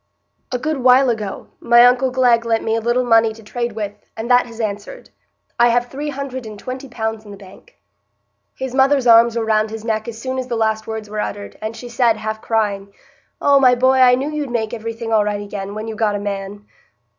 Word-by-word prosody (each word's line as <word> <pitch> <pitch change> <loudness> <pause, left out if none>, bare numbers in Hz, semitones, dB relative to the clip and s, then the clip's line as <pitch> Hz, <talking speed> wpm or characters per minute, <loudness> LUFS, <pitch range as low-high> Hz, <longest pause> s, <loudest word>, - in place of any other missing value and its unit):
"A 250 - 0
good 305 +4 -2
while 255 0 +5
ago, 215 -3 -5
my 235 0 +6
uncle 250 +1 +3
Glegg 250 -2 +3
lent 225 -1 0
me 225 - 0
a 225 - -1
little 240 +2 +1
money 225 -2 +3
to 225 0 -15
trade 235 +2 -4
with, 210 -2 -4 0.2
and 230 +3 -3
that 245 0 +4
has 230 -1 -12
answered. 205 -2 -5 0.5
I 240 - +6
have 245 +1 0
three 290 +2 -4
hundred 265 -4 -6
and 215 -1 -9
twenty 255 +5 -7
pounds 220 -2 -4
in 210 - -14
the 200 - -10
bank." 195 - -17 0.8
His 265 -1 -5
mother's 270 0 +3
arms 230 0 +6
were 225 - -1
round 215 0 +1
his 220 0 -8
neck 220 -1 -2
as 225 -1 -7
soon 260 +2 -3
as 255 - -4
the 240 -2 -2
last 220 -1 -1
words 220 -1 -5
were 210 +1 -5
uttered, 205 -1 -5
and 220 +1 -4
she 245 - -8
said, 235 -2 +2
half 215 0 -5
crying: 200 -3 -1 0.5
"Oh, 280 -1 +4
my 255 -2 +5
boy, 260 +1 +3
I 250 -1 +6
knew 275 +4 -3
you'd 300 -3 -3
make 225 -3 -2
iverything 230 0 -5
right 210 -1 +1
again, 200 0 -6
when 215 +1 -5
you 220 - -5
got 215 -1 0
a - - -2
man." 200 0 -5
230 Hz, 225 wpm, -19 LUFS, 215-250 Hz, 0.8 s, my